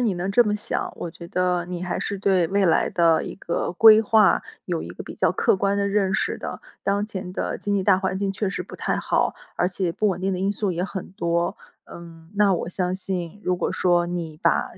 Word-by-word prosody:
你 220 -6 +1
能 180 +3 -2
这 240 +4 +6
么 210 -2 0
想， 210 - -3
我 170 - -5
觉 170 0 -11
得 180 -1 0
你 180 -1 -5
还 180 - -2
是 200 - -3
对 190 -3 +2
未 200 0 +2
来 170 - +3
的 165 -2 +3
一 - - -6
个 170 -3 -3
规 220 +3 +8
划 215 -2 +4 0.2
有 175 -3 -2
一 - - -7
个 90 - -8
比 - - -8
较 - - +2
客 - - +2
观 200 +1 +1
的 200 0 +1
认 195 -2 +1
识 - - -1
的。 - - -6 0.2
当 200 +1 +1
前 190 -4 -6
的 - - -3
经 205 0 -1
济 195 - 0
大 190 -1 +4
环 190 -1 -1
境 195 0 -1
确 205 0 -2
实 - - -3
不 - - -12
太 - - -1
好， - - 0 0.2
而 180 - +2
且 180 -2 -2
不 215 - +1
稳 185 -1 -2
定 195 +1 0
的 180 - -2
因 195 +2 +1
素 205 -2 -1
也 175 +1 -2
很 190 -1 -5
多。 170 -1 0 0.3
嗯， 165 -1 -12
那 200 -2 +4
我 170 - -3
相 180 +1 -2
信， 190 0 -5
如 180 - +2
果 - - -1
说 175 -1 +2
你 165 -3 -5
把 - - +2
185 Hz, 260 characters per minute, -24 LUFS, 175-200 Hz, 0.3 s, 规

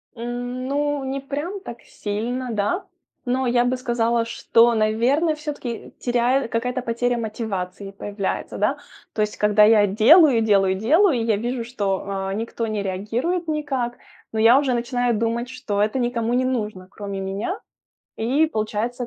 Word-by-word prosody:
М, 245 +2 -4
ну, 290 0 -1
не 270 +1 -2
прям 290 +8 -4
так 240 -10 -9
сильно, 240 +5 -4
да. 220 - -1 0.4
Но 255 +1 0
я 240 0 +3
бы 255 +1 0
сказала, 235 -2 0
что, 230 0 +3
наверное, 240 +9 +2
всё-таки 285 -6 -6
теряю 245 +1 +1
какая-то 250 +2 -1
потеря 240 +1 0
мотивации 200 -4 -4
появляется, 200 0 -4
да. - - +1 0.4
То 215 - -1
есть 210 0 -1
когда 210 0 +4
я 210 -1 +6
делаю 235 - +6
делаю 195 -3 +3
делаю, 290 - +3
и 225 - -1
я 220 -2 +2
вижу, 240 +2 -2
что, 200 -5 -2
а, 195 -1 -3
никто 230 +2 -3
не 215 -2 -2
реагирует 230 - -2
никак, 275 -6 -2 0.3
но 220 - -2
я 230 +4 +7
уже 270 -3 0
начинаю 245 0 0
думать, 230 +2 -1
что 215 -6 -2
это 215 +5 +1
никому 240 -1 -1
не 255 +1 +2
нужно, 210 -7 -3
кроме 200 -1 -6
меня, 195 - -3 0.6
и 265 +8 +2
получается, 235 0 -2
235 Hz, 155 wpm, -22 LUFS, 215-255 Hz, 0.6 s, я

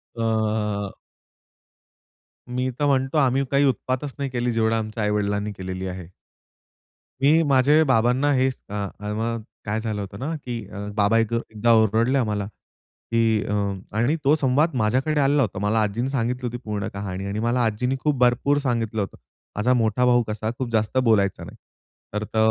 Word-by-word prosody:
अ 110 -3 -1 1.5
मी 125 +1 -1
तर 145 - +2
म्हणतो 135 0 +1
आम्ही 135 -1 +3
काही 140 +1 +4
उत्पातच 130 +2 -1
नाही 140 -1 -2
केली 125 -1 -1
जेवढं 115 0 +1
आमच्या 110 0 -3
आई-वडिलांनी 105 0 0
केलेली 95 0 -5
आहे. 90 -2 -6 1.1
मी 150 +4 +5
माझे 140 +4 +5
बाबांना 125 +4 +3
हे 130 0 +3
स - - -12
अ, - - -7
अ, 105 0 -5
म 115 +2 -1 0.3
काय 105 +1 -1
झालं 110 -2 -3
होतं 100 0 -7
ना 155 +6 -3
की 120 -1 -3
अ, 100 - -10 0.2
बाबा 105 +1 +3
एक 115 0 0
एकदा 115 0 0
ओरडले 110 +4 +3
आम्हाला 105 -4 -1
की 110 +1 -2
अ, 105 - -2 0.4
आणि 120 +8 +2
तो 145 +3 +5
संवाद 145 +2 +2
माझ्याकडे 130 +7 +1
आलेला 140 +1 +3
होता. 100 -6 -1
मला 105 +3 +1
आजींनी 115 +5 -1
सांगितली 125 -1 -1
होती 120 +1 -4
पूर्ण 105 -2 -3
कहाणी 95 -1 -5
आणि 100 +2 -3
मला 120 +2 +1
आजीनी 125 +4 0
खूप 150 -2 +1
भरपूर 125 +4 +3
सांगितलं 115 -3 0
होतं. 100 - -5 0.4
माझा 120 +5 +2
मोठा 125 +1 +2
भाऊ 120 -1 +4
कसा 110 +1 -3
खूप 130 -2 -3
जास्त 110 +2 0
बोलायचा 100 -5 +2
नाही. - - -10 0.6
तर 105 0 -1
त 110 - -2
115 Hz, 170 wpm, -23 LUFS, 105-130 Hz, 1.5 s, मी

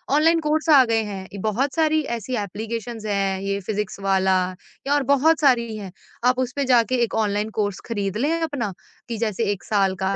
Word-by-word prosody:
online 325 +2 +4
course 310 +1 0
आ 285 -4 +8
गए 225 -1 +1
हैं, 195 -1 -7
बहुत 240 +6 0
सारी 315 -1 +2 0.2
ऐसी 245 +3 -4
एप्लीकेशंस 225 +2 -5
हैं, 195 -2 0
ये 200 0 -2
फिज़िक्स 210 0 -3
वाला 190 -1 +2 0.6
और 290 -1 +2
बहुत 280 +4 +3
सारी 235 -5 +3
हैं, 195 -3 -7 0.3
आप 250 0 +3
उसपे 260 +2 -1
जाके 250 0 +3
एक 230 - -2
ऑनलाइन 210 0 0
कोर्स 205 -2 -1
खरीद 205 -3 -2
लें 290 +7 +1
अपना 265 - -2 0.4
कि 230 - -3
जैसे 220 0 -1
1 195 - -5
साल 195 -3 +1
का, 190 +1 -1
225 Hz, 185 wpm, -23 LUFS, 200-265 Hz, 0.6 s, आ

